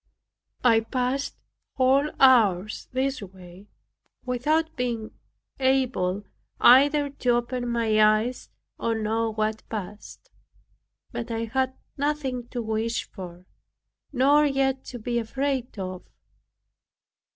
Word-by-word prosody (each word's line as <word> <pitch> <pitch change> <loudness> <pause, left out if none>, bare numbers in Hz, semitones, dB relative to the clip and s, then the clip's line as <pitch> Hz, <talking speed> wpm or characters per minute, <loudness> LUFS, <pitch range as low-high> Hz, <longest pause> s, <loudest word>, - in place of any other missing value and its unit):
I 230 -3 +5
passed 255 +4 -2 0.4
whole 270 +3 +3
hours 215 -7 +4
this 265 0 -1
way, 185 0 -12 0.6
without 310 +6 0
being 235 -4 -3 0.5
able 255 -8 +1 0.4
either 285 +3 +6
to 255 -3 -3
open 245 0 -2
my 225 -2 +2
eyes 215 +4 +1 0.3
or 230 -1 0
know 220 +1 -1
what 215 0 -2
passed; 210 -1 -8 0.8
but 235 0 -5
I 230 0 -2
had 260 +3 -1 0.2
nothing 275 -4 -2
to 240 -1 -4
wish 220 +1 -2
for, 180 -2 -10 0.7
nor 285 +2 +4
yet 270 -2 +1
to 245 - -7
be 235 +1 -2
afraid 260 +1 -2
of. 185 -1 -5
240 Hz, 105 wpm, -25 LUFS, 215-265 Hz, 0.8 s, either